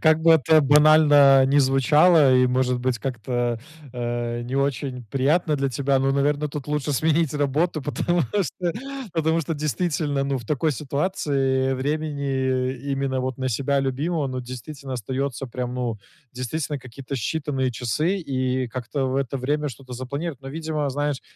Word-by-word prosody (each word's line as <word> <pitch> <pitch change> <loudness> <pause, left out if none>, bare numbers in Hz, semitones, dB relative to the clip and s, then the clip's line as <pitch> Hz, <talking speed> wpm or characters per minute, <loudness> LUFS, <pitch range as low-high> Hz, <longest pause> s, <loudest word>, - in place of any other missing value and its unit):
как 160 0 +4
бы 165 0 +6
это 160 0 +5
банально 145 -2 +6
ни 140 +2 +3
звучало 140 +2 +5
и, 125 0 +5
может 125 0 +1
быть, 125 -2 -1
как-то, 120 -1 -2 0.3
а, 120 -1 -3
не 125 +2 -5
очень 135 -2 -2
приятно 150 +4 +2
для 140 -1 0
тебя, 135 +2 +1
но, 135 +1 +1
наверно, 145 +2 +1
тут 145 0 -6
лучше 150 -1 -1
сменить 155 +1 +1
работу. 150 +2 0
Потому 170 +4 0
что 175 - -2 0.4
потому 160 0 +1
что 165 +1 -3
действительно, 150 -2 -1
ну, 135 -1 -1
в 120 - -10
такой 150 +4 0
ситуации 135 -2 0
времени 135 -3 -1 0.2
именно 135 -1 -1
вот 130 -1 -3
на 130 0 -1
себя 140 +4 0
любимого, 145 +4 -1
ну, 130 -1 -4
действительно 130 +2 -7
остаётся 130 +3 -3
прям, 125 0 -4
ну, 120 -4 -3 0.3
действительно, 140 +4 -3
какие-то 130 +2 -8
считанные 135 0 -1
часы, 155 - -1
и 130 -1 0
как-то 130 +2 -3
в 130 - -1
это 135 0 -1
время 150 +3 -1
что-то 130 0 -11
запланир 140 +5 -4
Но, 135 - -7
видимо, 155 -1 -2
знаешь, 145 0 -2
135 Hz, 155 wpm, -23 LUFS, 130-150 Hz, 0.4 s, бы